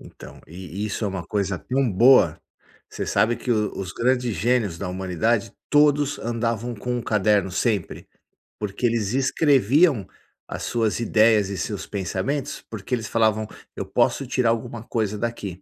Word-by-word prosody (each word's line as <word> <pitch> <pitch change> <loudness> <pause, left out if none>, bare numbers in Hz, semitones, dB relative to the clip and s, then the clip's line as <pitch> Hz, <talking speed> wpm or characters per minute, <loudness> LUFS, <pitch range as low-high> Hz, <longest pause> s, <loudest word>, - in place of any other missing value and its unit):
Então, - - -13
e 95 +5 -6
isso 105 +2 -3
é 100 - 0
uma 95 -3 -5
coisa 100 -3 -1
tão 130 -1 0
boa. 105 -5 +5 0.5
Você - - -4
sabe 120 +2 +2
que 125 - -5
o 105 -3 +1
os 95 -2 -5
grandes 125 -2 0
gênios 110 -5 +1
da 95 - -4
humanidade, 95 +4 -1 0.2
todos 145 -1 +3
andavam 115 0 -2
com 125 +3 -3
um 120 - -3
caderno 105 -3 +2
sempre, 105 -1 -2 0.5
porque 105 +3 -3
eles 115 -3 0
escreviam 135 - +3 0.4
as - - -6
suas 115 -2 0
ideias 110 -3 +3
e 100 - -4
seus 105 -3 -4
pensamentos, 100 +8 -3
porque 110 +3 -6
eles 110 -3 -5
falavam: 110 -1 +1 0.3
"Eu - - -4
posso 140 - +1
tirar 125 -2 +1
alguma 115 0 -2
coisa 110 -3 -2
daqui." 100 -5 -4
110 Hz, 160 wpm, -23 LUFS, 100-120 Hz, 0.5 s, boa